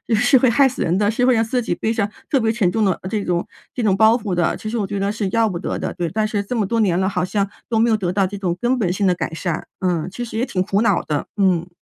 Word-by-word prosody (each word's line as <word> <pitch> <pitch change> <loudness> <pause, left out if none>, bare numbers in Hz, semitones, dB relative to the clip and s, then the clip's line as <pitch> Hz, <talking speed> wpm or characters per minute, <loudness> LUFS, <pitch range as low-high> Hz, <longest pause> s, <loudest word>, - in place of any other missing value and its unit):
是 245 +5 +5
会 250 -1 +3
害 270 +3 +4
死 255 - -6
人 175 +3 +1
的， 205 +1 +2
是 245 +2 +1
会 255 -1 +4
让 225 - +3
自 245 +2 -1
己 230 - -2
背 225 - -1
着 210 -3 -1 0.2
特 275 - +2
别 225 -2 +1
沉 215 -6 +1
重 220 0 +1
的 185 - +1
这 210 +1 -1
种 175 -1 0 0.3
这 245 - -3
种 195 -3 +2
包 220 +2 +6
袱 220 -6 -3
的， 175 -2 +1
其 215 - -6
实 235 - -2
我 205 -4 -1
觉 200 0 -4
得 200 +1 0
是 210 -2 -2
要 230 -1 +3
不 170 - -4
得 - - -3
的， - - -4
对。 175 -2 -3
但 215 +4 0
是 210 -1 -1
这 225 +5 -4
么 215 - +1
多 230 +4 -1
年 185 -5 +2
了， 190 0 +1
好 180 -2 -1
像 200 +1 -1 0.2
都 230 - 0
没 230 +2 +3
有 220 - +3
得 180 -3 -2
到 195 0 +2
这 200 +2 -5
种 180 -3 -2
根 250 +1 +1
本 180 -5 +1
性 200 +1 -1
的 185 - +4
改 175 - -4
善。 170 0 -3
嗯， 175 -4 0
其 240 +6 -6
实 225 -1 -6
也 245 - +1
挺 185 -7 -1
苦 200 +3 0
恼 235 - +2
的， 150 - -3
嗯。 185 -4 +2
205 Hz, 340 characters per minute, -20 LUFS, 185-230 Hz, 0.3 s, 包